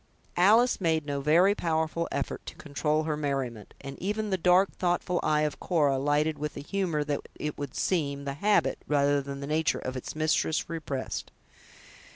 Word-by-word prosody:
Alice 220 +6 +5
made 160 -3 +1
no 140 -1 -2
very 170 +7 +5
powerful 165 -2 -1
effort 140 - -3
to - - -7
control 150 +1 -1
her 155 -1 -1
merriment; 135 -7 -3
and 135 0 -8
even 210 +2 -2
the - - +3
dark, 180 +2 +4
thoughtful 175 0 0
eye 150 0 +2
of 150 -1 -1
Cora 145 -6 +2
lighted 150 +2 +1
with 150 0 -4
a - - -4
humor 170 -2 -1
that 145 -1 -2
it 150 -1 -4
would 145 -2 -6
seem, 140 -6 -1
the 140 - -2
habit, 205 +9 +2
rather 145 -1 +2
than 140 0 -7
the - - -4
nature, 155 +1 +1
of 130 0 -5
its 130 - -6
mistress 155 0 +1
repressed. 155 -5 -4
150 Hz, 180 wpm, -28 LUFS, 140-175 Hz, -, Alice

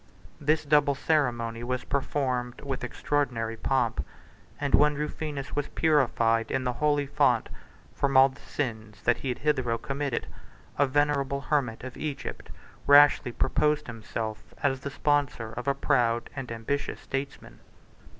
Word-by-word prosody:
This 155 +1 +1
double 145 -1 +4
ceremony 120 -6 0
was 125 +1 -2
performed 130 -3 -2
with 135 -2 -4
extraordinary 120 -6 -1
pomp; 115 - 0 0.6
and 145 -1 -2
when 150 0 +5
Rufinus 150 -1 -4
was 145 -1 -1
purified, 120 -7 +2
in 130 - -1
the 125 -1 -1
holy 145 +3 +1
font, 140 +1 +2 0.4
from 140 -1 +1
all 135 +1 +8
the 135 - -16
sins 110 -6 -5
that 120 - +3
he 135 - -4
had 125 - -2
hitherto 130 -6 0
committed, 140 0 -3 0.5
a 145 - +5
venerable 140 0 +1
hermit 135 -7 -1
of 130 -1 -7
Egypt 140 -5 -5 0.4
rashly 145 -2 +6
proposed 150 +4 +1
himself 110 -2 -6
as 135 -2 +2
the 140 - -5
sponsor 140 -6 0
of 125 +3 -6
a 140 - +2
proud 120 -4 +1
and 135 -4 -5
ambitious 115 +6 -3
statesman. 135 +1 -6
135 Hz, 140 wpm, -27 LUFS, 120-145 Hz, 0.6 s, all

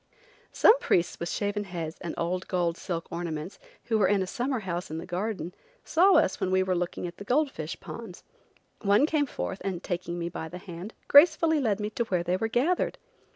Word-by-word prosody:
Some 475 +3 +6
priests 175 - +1
with 170 - -3
shaven 205 0 -1
heads 170 -4 -5
and 170 - -4
old 180 +2 -2
gold 175 -3 0
silk 170 -3 -5
garments, 170 +1 -4 0.2
who 225 -2 +1
were 195 - +4
in 195 0 +2
a - - -3
summer 245 +5 -2
house 180 -2 -4
in 160 - -4
the 165 - -6
garden, 180 -1 -3 0.3
saw 375 +4 +5
us - - +3
when 185 - 0
we 185 0 +3
were 185 0 0
looking 175 0 -2
at 175 0 -7
the - - -8
gold 275 +6 +2
fish - - -6
ponds. - - -9 0.6
One 205 +6 +4
came 305 -2 +1
forth, 195 -6 -4
and, 185 -3 -3
taking 175 -1 -3
me 170 0 -2
by 160 -2 -5
the 180 - -7
hand, 180 +3 -9
gracefully 320 +1 +6
led 220 -6 +1
me 210 0 -3
to 235 - -1
where 180 -5 0
they 180 +1 0
were 225 +4 -1
gathered. 275 +11 +1
185 Hz, 210 wpm, -28 LUFS, 175-225 Hz, 0.6 s, Some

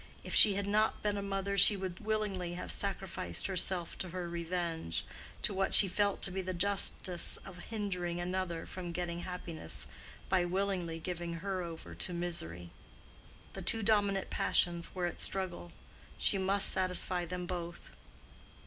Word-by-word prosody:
If - - -6
she 205 -2 +8
had 200 0 -2
not 210 +2 +1
been 205 -1 0
a 200 - -3
mother 200 0 -2
she 200 +2 +8
would 185 -2 -5
willingly 210 -5 -2
have 180 - -5
sacrificed 190 - -3
herself 185 -2 -1
to 185 - -3
her 180 0 -5
revenge—to 170 - -4
what 195 0 +3
she 200 - +12
felt 200 +2 0
to 195 - +2
be 190 +1 -3
the 185 0 -4
justice 185 -1 +1
of 180 -2 -10
hindering 180 -6 -3
another 175 -1 -3
from 175 -2 -7
getting 170 -1 -3
happiness 165 - -5 0.4
by 185 -2 +2
willingly 180 -2 -2
giving 170 0 -5
her 190 +2 -3
over 165 -2 -8
to 180 - 0
misery. 90 - -3 0.8
The - - -7
two 225 -1 +2
dominant 200 -2 +1
passions 170 0 0
were 180 -1 -1
at 175 - -3
struggle. 180 - -3 0.5
She 195 - +2
must 195 +1 +4
satisfy 180 -1 +2
them 180 +1 -5
both. 175 -1 -6
180 Hz, 155 wpm, -32 LUFS, 170-195 Hz, 0.8 s, she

